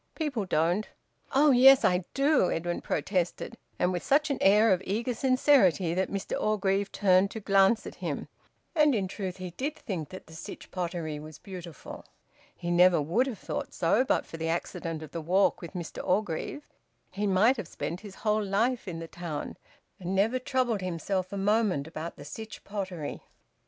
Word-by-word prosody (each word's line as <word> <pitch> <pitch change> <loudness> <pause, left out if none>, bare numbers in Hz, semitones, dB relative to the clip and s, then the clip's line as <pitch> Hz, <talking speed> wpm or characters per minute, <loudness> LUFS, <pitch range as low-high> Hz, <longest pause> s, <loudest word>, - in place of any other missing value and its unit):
"People 285 - -2
don't." 175 +4 +1 0.5
"Oh 290 +2 +6
yes! 265 +1 +7
I 180 0 +2
do!" 275 - +3
Edwin 175 +1 -2
protested, 185 +4 -2 0.2
and 180 - +1
with 175 - -2
such 295 +2 +2
an 275 - -1
air 210 +2 +6
of 185 - -1
eager 230 +5 -1
sincerity 240 - +3
that 185 +2 0
Mr 195 -1 -3
Orgreave 200 -1 +1
turned 190 -1 +3
to 220 - -6
glance 195 +2 +3
at - - -7
him. - - -3 0.5
And 300 -5 +4
in 195 -3 0
truth 185 -1 -5
he 185 -1 -6
did 280 - -3
think 185 - -5
that 185 - -10
the 160 - -15
Sytch 160 - -9
Pottery 170 -4 -3
was 155 0 -10
beautiful. 175 -3 -9 0.5
He 175 - -4
never 175 0 +5
would 175 - +1
have 245 -6 -4
thought - - -5
so 190 +9 +3
but 265 - +1
for 165 - -9
the 165 0 -2
accident 165 -1 -3
of 155 - -10
the 165 - -4
walk 185 +5 +2
with 170 - -8
Mr 175 -3 -6
Orgreave; 205 - -1 0.4
he 205 +1 -2
might 210 +7 +4
have 210 -7 -5
spent 170 +1 -5
his 205 -3 -10
whole 215 0 +2
life 225 +5 0
in 170 -3 -4
the 165 0 -6
town, 165 -4 -5 0.4
and 185 +1 -3
never 220 +6 +2
troubled 250 -5 0
himself 185 +1 -2
a 200 - -4
moment 200 -6 +1
about 160 +1 -6
the - - -11
Sytch 215 +9 -8
Pottery. 190 -7 -5
190 Hz, 185 wpm, -28 LUFS, 175-220 Hz, 0.5 s, yes